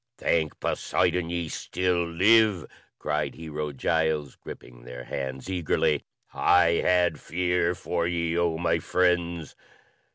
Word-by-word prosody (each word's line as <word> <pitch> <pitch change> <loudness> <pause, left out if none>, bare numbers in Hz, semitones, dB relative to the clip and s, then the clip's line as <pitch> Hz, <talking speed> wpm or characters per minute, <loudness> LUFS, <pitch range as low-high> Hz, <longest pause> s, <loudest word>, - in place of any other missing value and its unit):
"Thank 80 -3 0
Poseidon, 90 -1 0
ye 85 -1 -2
still 90 +1 -1
live!" 100 +1 +4 0.3
cried - - -2
Hero 75 -2 -5
Giles, 75 0 -1
gripping - - -11
their 60 0 -9
hands 65 0 -5
eagerly. 85 -5 0 0.3
"I 85 -1 +4
had 90 -4 +2
fear 90 0 0
for 85 -1 -2
ye, 85 -1 -1
oh 85 -2 +1
my 85 0 +1
friends." 85 -2 0
85 Hz, 120 wpm, -26 LUFS, 75-90 Hz, 0.3 s, live